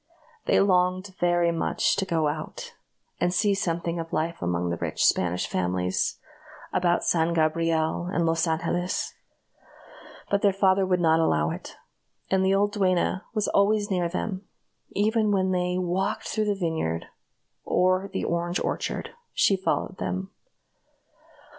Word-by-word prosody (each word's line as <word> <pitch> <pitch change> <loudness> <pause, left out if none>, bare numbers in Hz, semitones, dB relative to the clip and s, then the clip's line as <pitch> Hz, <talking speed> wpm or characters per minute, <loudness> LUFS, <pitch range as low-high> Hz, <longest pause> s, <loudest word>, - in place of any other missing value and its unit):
They - - +4
longed 185 0 +2
very 175 -1 +3
much 165 - +1
to 190 - -1
go 160 -3 +1
out, 470 - -5 0.5
and 175 - +2
see 205 +2 +2
something 170 -3 -2
of 165 0 -6
life 165 +2 -2
among 90 0 -1
the 85 - -2
rich - - -1
Spanish 90 0 +2
families 90 0 -1 0.6
about 175 -1 +2
San 170 0 +1
Gabriel 160 +1 +1
and 170 -3 +1
Los 165 +1 +1
Angeles, 170 +2 -1 1.2
but 200 0 +2
their 200 - +4
father 190 0 +3
would 180 -1 +2
not 160 -1 +4
allow 80 - +2
it; - - -8 0.6
and 190 0 +3
the 190 +1 +3
old 205 +1 +2
duenna 190 -1 +1
was 210 -1 +1
always 205 +1 +2
near 175 -2 +1
them; 190 +2 -4 0.5
even 215 +1 +2
when 190 -2 +2
they 180 0 0
walked 185 +1 -1
through 215 -1 -1
the 205 -1 +1
vineyard 160 - -2 0.6
or 185 +2 +2
the 190 - -3
orange 175 +1 -1
orchard, - - -3 0.2
she 195 - +4
followed 190 0 -2
them. 190 +1 -3
180 Hz, 145 wpm, -26 LUFS, 165-195 Hz, 1.2 s, They